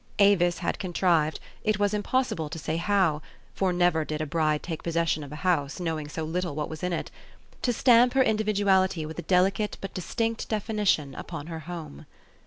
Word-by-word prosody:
Avis 185 Hz, -4 st, +4 dB
had -, -, -2 dB
contrived, 170 Hz, -4 st, +1 dB, 0.2 s
it 215 Hz, -2 st, +1 dB
was 205 Hz, 0 st, +1 dB
impossible 210 Hz, -, 0 dB
to 165 Hz, -, -6 dB
say 160 Hz, 0 st, -2 dB
how, 170 Hz, -4 st, +2 dB, 0.3 s
for 190 Hz, -2 st, +1 dB
never 175 Hz, -2 st, +2 dB
did 155 Hz, 0 st, -4 dB
a 155 Hz, -, -1 dB
bride 155 Hz, -1 st, 0 dB
take 165 Hz, -3 st, -5 dB
possession 165 Hz, -2 st, 0 dB
of 140 Hz, -, -10 dB
a -, -, -6 dB
house, 150 Hz, -5 st, +1 dB
knowing 160 Hz, -4 st, -2 dB
so 160 Hz, +2 st, -5 dB
little 170 Hz, 0 st, -2 dB
what 150 Hz, -1 st, -3 dB
was 155 Hz, -1 st, -7 dB
in 180 Hz, -, -1 dB
it, 170 Hz, -, -3 dB, 0.5 s
to 245 Hz, -, +1 dB
stamp 245 Hz, +1 st, +5 dB
her 265 Hz, -, +6 dB
individuality 200 Hz, -6 st, +2 dB
with 160 Hz, +2 st, -7 dB
a -, -, -1 dB
delicate 195 Hz, +4 st, +1 dB
but 195 Hz, -, -7 dB
distinct 225 Hz, +5 st, -2 dB
definition 210 Hz, -, 0 dB
upon 155 Hz, +1 st, -7 dB
her 165 Hz, -1 st, -6 dB
home. 160 Hz, -, -8 dB
175 Hz, 190 wpm, -27 LUFS, 155-205 Hz, 0.5 s, her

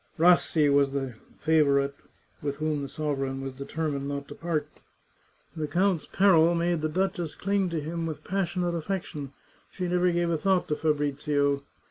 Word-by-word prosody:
Rassi 165 Hz, -2 st, +4 dB
was 140 Hz, -1 st, +3 dB
the 135 Hz, -3 st, -2 dB, 0.2 s
favourite 140 Hz, -3 st, +3 dB, 0.5 s
with 140 Hz, -1 st, -2 dB
whom 155 Hz, 0 st, -1 dB
the 140 Hz, -, -4 dB
sovereign 135 Hz, -2 st, -2 dB
was 135 Hz, -1 st, -5 dB
determined 140 Hz, +1 st, -3 dB
not 140 Hz, 0 st, -4 dB
to -, -, -6 dB
part. 165 Hz, -3 st, -3 dB, 0.7 s
The 155 Hz, -2 st, -2 dB
count's 180 Hz, +1 st, +1 dB
peril 175 Hz, -4 st, +5 dB
made 170 Hz, -1 st, +1 dB
the 155 Hz, -, 0 dB
duchess 175 Hz, -1 st, -1 dB
cling 200 Hz, -1 st, 0 dB
to 165 Hz, -1 st, -2 dB
him 165 Hz, +2 st, -3 dB
with 155 Hz, -2 st, -6 dB
passionate 180 Hz, -2 st, -1 dB
affection; 160 Hz, -5 st, -4 dB, 0.4 s
she 180 Hz, -2 st, -4 dB
never 180 Hz, 0 st, +2 dB
gave 170 Hz, 0 st, +1 dB
a 160 Hz, -, 0 dB
thought 190 Hz, +1 st, +2 dB
to 150 Hz, -, +1 dB
Fabrizio. 145 Hz, -2 st, +1 dB
155 Hz, 160 wpm, -27 LUFS, 140-175 Hz, 0.7 s, peril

